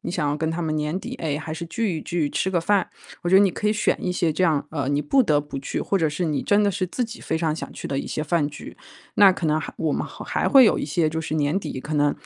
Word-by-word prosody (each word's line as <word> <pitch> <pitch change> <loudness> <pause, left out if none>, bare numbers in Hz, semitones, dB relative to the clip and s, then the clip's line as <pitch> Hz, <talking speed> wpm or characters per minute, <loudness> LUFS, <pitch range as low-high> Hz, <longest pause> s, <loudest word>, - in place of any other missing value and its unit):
你 - - -5
想 170 -4 -1
要 145 - 0
跟 160 +1 -1
他 165 +2 -3
们 160 -2 -1
年 150 +3 -1
底， 245 +6 -7
哎， 150 - -2
还 155 0 -5
是 170 - -5
聚 200 -2 -1
一 - - -8
聚， 170 -4 -1
吃 190 - -1
个 175 -2 +1
饭。 200 +3 +1 0.3
我 175 - -1
觉 190 - +6
得 - - +8
你 200 - +5
可 210 - -1
以 - - +3
选 210 - +1
一 180 - 0
些 170 -3 +1
这 175 - -1
样， 155 -5 +2
呃， 145 -4 -2
你 145 +1 +1
不 260 - +3
得 150 -10 +2
不 145 -1 -8
去， 135 - -3
或 200 - 0
者 165 -4 +2
是 150 +4 -2
你 155 -3 -1
真 205 0 +3
的 205 - +3
是 185 -1 -1
自 245 +7 -1
己 230 +1 -9
非 160 - -2
常 160 -2 0
想 - - -7
去 - - -7
的 140 - -3
一 - - -7
些 150 - -3
饭 155 -1 +1
局。 150 - -10 0.4
那 200 -1 +7
可 180 - -3
能 155 0 +2
还 - - -6
我 160 -3 0
们 - - -1
还 - - -3
会 270 -2 +8
有 215 - +4
一 - - -2
些 155 +2 +1
就 160 +1 -3
是 155 - -4
年 150 +4 +1
底 130 - -5
可 150 +4 -5
能， 145 -1 +3
160 Hz, 340 characters per minute, -23 LUFS, 150-190 Hz, 0.4 s, 得